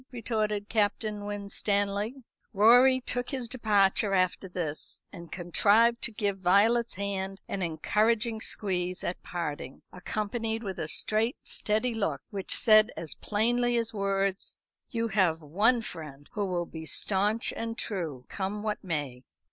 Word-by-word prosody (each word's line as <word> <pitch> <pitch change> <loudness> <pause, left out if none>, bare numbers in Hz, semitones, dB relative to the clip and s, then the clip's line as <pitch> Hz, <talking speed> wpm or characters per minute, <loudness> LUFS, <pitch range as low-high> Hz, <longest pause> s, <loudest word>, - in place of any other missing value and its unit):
retorted 215 -3 -1
Captain 210 -1 0
Winstanley. 205 +3 -1 0.3
Rorie 245 +5 +6
took 245 0 -3
his 260 -4 -3
departure 205 -4 +2
after 185 +1 0
this, 165 -4 -3
and 170 -1 -10
contrived 210 +7 +3
to 235 - +1
give 205 -2 -2
Violet's 215 +6 +3
hand 195 0 -3
an 195 - -3
encouraging 215 +7 +1
squeeze 180 -5 -2
at 175 - -3
parting, 145 -6 -5
accompanied 220 +4 -2
with 190 -3 -5
a 155 - -1
straight 220 - +1
steady 220 +3 0
look, 160 -11 -2
which 195 -2 -4
said 215 -1 +6
as 160 -4 -5
plainly 240 +3 +1
as 230 -1 -1
words: 195 -1 -1 0.3
"You 230 -1 -1
have 185 -6 +2
one 210 - +2
friend 145 -7 -8
who 205 -1 -1
will 175 -2 -1
be 160 -1 -9
stanch 205 +8 0
and 230 0 -4
true, 160 - -4
come 205 +2 -4
what 215 -1 -2
may." 145 -8 -3
205 Hz, 140 wpm, -29 LUFS, 185-225 Hz, 0.3 s, Rorie